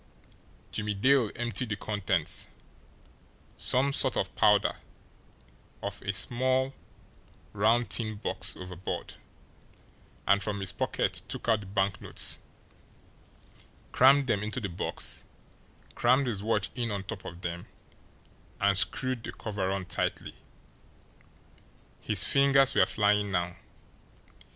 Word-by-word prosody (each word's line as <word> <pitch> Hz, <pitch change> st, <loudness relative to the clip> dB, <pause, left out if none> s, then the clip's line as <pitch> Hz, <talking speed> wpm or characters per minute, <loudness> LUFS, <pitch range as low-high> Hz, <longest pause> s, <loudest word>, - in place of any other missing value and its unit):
Jimmie 105 Hz, -1 st, -2 dB
Dale 130 Hz, +2 st, +3 dB
emptied 120 Hz, 0 st, -1 dB
the 105 Hz, -, -1 dB
contents, 100 Hz, -6 st, 0 dB, 1.1 s
some 140 Hz, +2 st, +2 dB
sort -, -, +3 dB
of -, -, -2 dB
powder, -, -, +3 dB, 1.1 s
of -, -, -4 dB
a 100 Hz, -, -2 dB
small, 130 Hz, +6 st, +1 dB, 0.8 s
round 110 Hz, +4 st, +2 dB
tin 110 Hz, -2 st, -1 dB
box 105 Hz, -, 0 dB
overboard, 90 Hz, 0 st, -6 dB, 1.1 s
and 100 Hz, 0 st, +4 dB
from 100 Hz, -1 st, -2 dB
his 95 Hz, -2 st, 0 dB
pocket -, -, -1 dB
took -, -, -5 dB
out 110 Hz, -2 st, +3 dB
the 100 Hz, -, -10 dB
banknotes, 95 Hz, -1 st, -1 dB, 1.5 s
crammed 135 Hz, +2 st, +6 dB
them 110 Hz, -5 st, 0 dB
into 110 Hz, +4 st, -3 dB
the 100 Hz, -5 st, -4 dB
box, 85 Hz, -, -4 dB, 0.7 s
crammed 130 Hz, +3 st, +3 dB
his 110 Hz, -6 st, -2 dB
watch 110 Hz, +2 st, 0 dB
in 120 Hz, -2 st, -2 dB
on 100 Hz, -2 st, -3 dB
top 100 Hz, 0 st, -7 dB
of 85 Hz, +1 st, -9 dB
them, 85 Hz, 0 st, -5 dB, 0.9 s
and 100 Hz, -2 st, +4 dB
screwed 130 Hz, +2 st, 0 dB
the -, -, -5 dB
cover 100 Hz, -4 st, -3 dB
on 95 Hz, -1 st, -2 dB
tightly. 90 Hz, -, -3 dB, 1.7 s
His 105 Hz, -5 st, +3 dB
fingers 140 Hz, -1 st, +4 dB
were -, -, +4 dB
flying 105 Hz, -1 st, +2 dB
now. 90 Hz, -2 st, -1 dB
105 Hz, 115 wpm, -29 LUFS, 95-120 Hz, 1.7 s, crammed